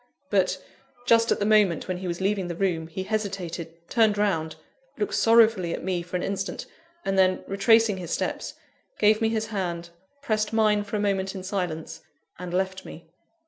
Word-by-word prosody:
But, 190 -3 +2 0.5
just 230 -1 +4
at - - +3
the 205 - -1
moment 210 -6 +3
when 185 -1 -2
he 185 0 -5
was 170 -1 -3
leaving 195 -1 0
the 170 - -4
room, 170 -3 -1
he 175 +3 -5
hesitated, 175 -5 -4
turned 220 -3 +3
round, 165 -6 0 0.4
looked 415 - -2
sorrowfully 225 -6 +4
at - - -8
me 180 -1 -1
for 180 +1 -8
an 180 - -1
instant, 195 0 -3 0.4
and 195 0 +1
then, 185 -1 +3
retracing 215 +1 +3
his 175 -3 -7
steps, - - -3 0.4
gave 215 +1 +4
me 225 - +3
his 220 -1 -1
hand, 170 -3 -3 0.3
pressed 215 -4 0
mine 215 -2 +3
for 205 +1 -5
a - - 0
moment 195 -1 -1
in 190 - -6
silence, 165 -5 -4 0.4
and 180 -1 -6
left 190 +1 -1
me. 165 0 -12
190 Hz, 185 wpm, -26 LUFS, 175-210 Hz, 0.5 s, just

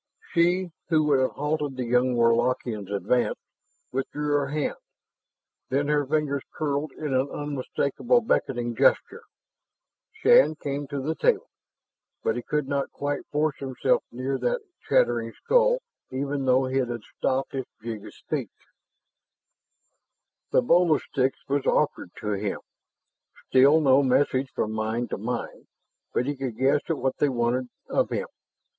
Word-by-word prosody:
She 175 +1 +2 0.2
who 160 -2 +4
would 145 -3 +3
have 130 - +1
halted 150 -2 -2
the 130 - -1
young 125 +1 +2
Warlockian's 115 -3 +1
advance, 105 +5 +1 0.5
withdrew 145 +3 -2
her 145 -1 +2
hand. 150 +1 -2 0.9
Then 140 +2 0
her 145 -2 +2
fingers 145 -2 0
curled 145 -1 -1
in 150 -3 -4
an 130 +2 +1
unmistakable 145 - 0
beckoning 120 - 0
gesture. - - +2 0.9
Shann 440 - +5
came 145 -1 -4
to 140 0 -4
the 155 +3 0
table, 470 - +1 0.7
but 460 - +1
he - - -2
could 150 -2 -1
not 140 -1 -1
quite 145 0 -3
force 150 0 0
himself 135 -2 0
near 130 +2 -2
that - - 0 0.3
chattering - - +2
skull, - - +2 0.3
even 140 +1 -2
though 130 +1 +4
it 130 -1 0
had 120 -1 -4 0.2
stopped 130 +1 0
its 130 -2 -4
jig 110 -3 -5
of - - -11
speech. - - -4 2.0
The 125 - +3
bowl 170 +4 +4
of - - -3
sticks 135 -1 0
was 140 0 0
offered - - +1
to 105 - -2
him. 100 0 -2 0.9
Still 140 +4 +6
no 135 -2 +5
message 130 0 +2
from 110 - -1
mind 110 +2 -2
to - - -3
mind, 120 +3 -4 0.4
but 125 - 0
he 145 +1 -2
could 130 -4 -4
guess 140 +3 +3
at 165 - +1
what 130 0 -1
they 145 - +2
wanted 125 0 0 0.2
of - - +1
him. - - -2
135 Hz, 150 wpm, -26 LUFS, 125-150 Hz, 2.0 s, Still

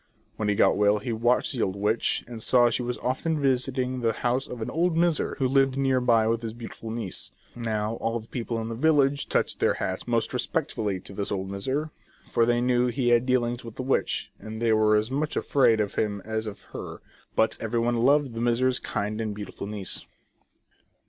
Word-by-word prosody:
When 105 -1 -1
he 105 - +2
got - - +4
well 105 0 +4
he 115 +3 -3
watched 120 +5 +2
the 125 - -2
old 95 -2 0
witch, 105 +3 0
and 120 -2 -8
saw 120 0 +4
she - - 0
often 130 +6 -1
visited 130 -1 0
the 115 -1 +2
house 125 +3 -1
of 125 - -7
an 110 - -4
old 170 0 +1
miser 170 -2 +1
who 130 - +1
lived 135 0 +3
near 135 -2 +2
by 115 -3 +3
with 115 0 +1
his 115 -2 -5
beautiful 115 -1 -8
niece. 110 -4 -5 0.3
Now 110 -1 -2
all 115 +1 -1
the 110 - -13
people 115 -1 -3
in 110 - -4
the - - -3
village 140 +1 +2
touched - - 0
their - - +2
hats 95 +4 -3
most 115 0 0
respect 150 +4 -1
fully 105 -5 -2
to - - -12
this 100 0 -3
old 95 -1 -3
miser, 130 +11 -2 0.3
for 115 - +2
they 120 0 +2
knew 125 0 +2
he 125 0 0
had 120 +1 +4
dealings 120 -1 +1
with 115 -1 -9
the 130 - -4
witch, 135 - 0
and 110 0 -7
they 115 -1 +3
were 110 0 +4
as 110 +3 +1
much 150 +3 -1
afraid 115 -6 +3
of 105 -2 -1
him 105 -2 -1
as 110 0 -2
of 105 - -7
her; - - -7 0.4
but 110 - +3
everyone 115 +1 0
loved 135 +2 +3
the 115 - -4
miser's 125 +2 +2
kind 105 +2 -3
and 110 -2 -3
beautiful 100 -1 -7
niece. 100 -3 -4
120 Hz, 210 wpm, -26 LUFS, 110-130 Hz, 0.4 s, got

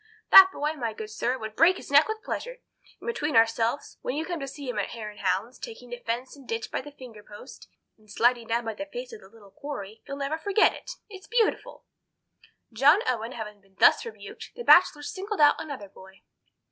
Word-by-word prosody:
That 380 -1 +11
boy, 300 -3 -2
my 235 -7 -4
good 215 0 -8
sir, 245 +4 -1
would 220 -2 -7
break 355 - +5
his - - -11
neck 285 +2 +6
with 435 0 -5
pleasure; - - -5 0.4
and - - -13
between 310 - -2
ourselves, 230 +3 +1
when 250 - -3
you 315 +2 -2
come 345 -1 -4
to 275 - -5
see 280 0 -9
him 250 - -3
at - - -2
hare 215 -3 -7
and 210 - -16
hounds, 195 +6 -2
taking 240 +2 -10
the 245 - -6
fence 240 +3 -4
and 275 -3 -16
ditch 225 0 -4
by - - -2
the 290 - -11
finger 250 -6 -12
post, 205 +5 -13 0.3
and 215 0 -24
sliding 240 +2 +1
down 230 +1 -1
the 225 +7 -5
face - - -7
of 450 - -10
the - - -16
little 205 -2 -18
quarry, 225 -7 -8
you'll 275 - -6
never 285 +3 -3
forget 400 +5 +3
it. - - -11 0.2
It's 390 -2 -12
beautiful!" 455 -1 -1 0.9
John 290 - +5
Owen 235 -1 -2
having 210 -3 -8
been 195 -1 -29
thus - - +5
rebuked, 460 - -10
the 475 - -7
Bachelor 345 -8 +5
singled 395 +6 -5
out 295 -1 +5
another 280 -10 -7
boy. 190 0 -17
255 Hz, 215 wpm, -26 LUFS, 225-315 Hz, 0.9 s, That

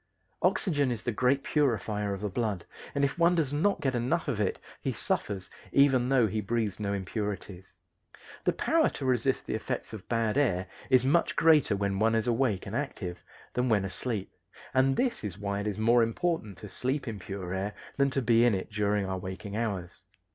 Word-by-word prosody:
Oxygen 165 -7 +2
is 115 -2 -4
the 120 - 0
great 130 +5 +2
purifier 105 -8 0
of 100 -1 -4
the 105 - -1
blood, 105 -3 -2 0.3
and 140 - +1
if 140 +5 -3
one 170 +1 +5
does 150 -5 0
not 195 +7 +1
get 135 -2 +1
enough 125 +8 0
of 105 - 0
it 100 - 0 0.2
he - - -1
suffers 95 -2 -2 0.2
even 130 -3 +4
though 130 -4 +5
he 110 +1 -1
breathes 110 -1 -1
no 100 -1 -1
impurities. 100 -1 -4 0.7
The - - +3
power - - +2
to 135 - -6
resist 130 +1 +1
the - - -3
effects 110 +1 -3
of 105 -4 -9
bad 115 +2 +1
air 95 -10 +1 0.2
is 130 -1 +5
much 160 +6 +2
greater 155 -9 +5
when 100 -1 -1
one 115 +1 +3
is 110 - +1
awake 120 -5 +1
and 105 - -5
active 110 -10 -4 0.3
than 125 0 +1
when 105 -3 +3
asleep, 100 +1 -3 0.4
and 135 +1 +3
this 255 - 0
is 100 -3 -4
why 100 -1 -2
it 100 - -3
is 105 - -2
more 115 +2 +4
important 115 - -1
to 105 - -8
sleep 130 +8 -2
in 110 -3 -4
pure 95 -1 -5
air 100 +2 -2 0.2
than 140 0 +3
to 135 0 -1
be 115 0 +5
in 120 -4 +4
it 95 - -5
during 105 -1 +1
our 95 0 -3
waking 95 +3 -6
hours. 100 -6 -3
115 Hz, 200 wpm, -29 LUFS, 100-130 Hz, 0.7 s, one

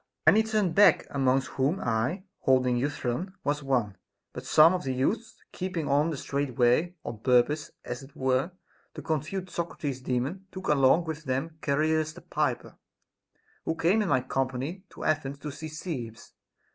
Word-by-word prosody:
Many 215 - +7
turned 215 -5 0
back, 205 +4 +6
amongst 135 -1 +2
whom 140 +8 0
I, 120 - -1 0.2
holding 130 -1 +3
Euthyphron, 145 +6 -2
was 145 +1 0
one; 120 -8 0 0.4
but - - -8
some 160 +3 +7
of 180 - -2
the 130 -2 -2
youths 210 - -1
keeping 180 -5 -3
on 145 +3 +3
the 155 - -3
straight 140 -2 -3
way, 135 +9 +3
on 110 - -5
purpose 130 +5 +2 0.2
(as 120 - -5
it 135 +1 -14
were) 130 +4 +1 0.5
to - - -7
confute 170 +4 -3
Socrates's 145 -6 -4
Daemon, 135 +10 -2
took 190 0 -6
along 145 +3 +5
with 160 -1 -6
them 140 +5 -2
Char 140 +1 +1
illus 155 0 +1
the 175 - -12
piper, - - -2 0.8
who 160 - -1
came 180 +7 +3
in 205 - -1
my 130 -2 +3
company 135 +8 -3
to - - -10
Athens 145 -3 0
to 145 +1 -6
see 155 +3 -7
Cebes. 145 -8 -6
145 Hz, 170 wpm, -28 LUFS, 130-170 Hz, 0.8 s, Many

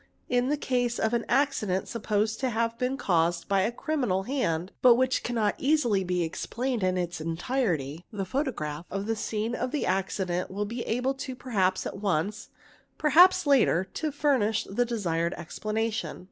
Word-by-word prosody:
in 245 0 +1
the 295 - +1
case 245 -3 0
of 220 +1 0
an 235 - +1
accident 240 -8 +1
supposed 215 -1 -1
to 260 - 0
have 230 0 0
been 255 +1 0
caused 170 - +1
by 195 -1 +2
a 215 +5 +1
criminal 240 -8 -1
hand 190 - -1
but 245 -2 +7
which 260 +1 +1
cannot 225 -4 0
easily 265 -9 +2
be 180 -1 0
explained 235 +8 -3
in 185 0 +1
its 175 -2 -3
entirety, 165 - -1
the 200 -3 -3
photograph 180 - -3
of 195 +1 -3
the 225 +1 0
scene 220 +1 -2
of 250 +1 -2
the 295 +2 -1
'accident 185 -1 -1
will 205 +2 -2
be 235 +4 -5
able, 250 +4 0 0.2
perhaps 190 -8 0
at - - -5
once, 200 +2 -1 0.5
perhaps 325 +5 +6
later, 260 - +4
to 310 -1 -2
furnish 260 -7 +1
the 245 +5 0
desired 170 -7 -1
explanation. 215 +6 -3
220 Hz, 165 wpm, -27 LUFS, 185-250 Hz, 0.5 s, but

